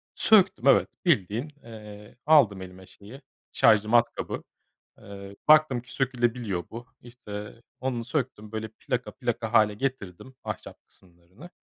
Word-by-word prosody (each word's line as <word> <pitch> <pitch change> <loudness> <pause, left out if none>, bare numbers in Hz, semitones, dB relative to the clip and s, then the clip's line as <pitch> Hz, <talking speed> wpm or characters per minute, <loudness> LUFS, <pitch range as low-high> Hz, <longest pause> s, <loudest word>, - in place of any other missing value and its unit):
Söktüm, 205 -3 +4
evet, - - +5 0.2
bildiğin, 120 - +1
eee, 105 -2 -12
aldım 135 -11 +4
elime, 95 0 -11
şeyi, 110 +10 -14 0.3
şarjlı 110 0 +4
matkabı. 120 0 0 0.6
Iıı, 100 0 -11
baktım 155 -5 +5
ki 120 - -15
sökülebiliyor 120 -7 -2
bu. 120 +2 -9
İşte, 115 -3 -10 0.2
onu 125 -3 -3
söktüm, 125 -6 -4
böyle 110 0 -4
plaka - - -3
plaka 110 +1 -4
hâle 105 -2 +4
getirdim 125 -1 -5
ahşap - - -8
kısımlarını. 90 - -18
115 Hz, 125 wpm, -26 LUFS, 100-130 Hz, 0.6 s, evet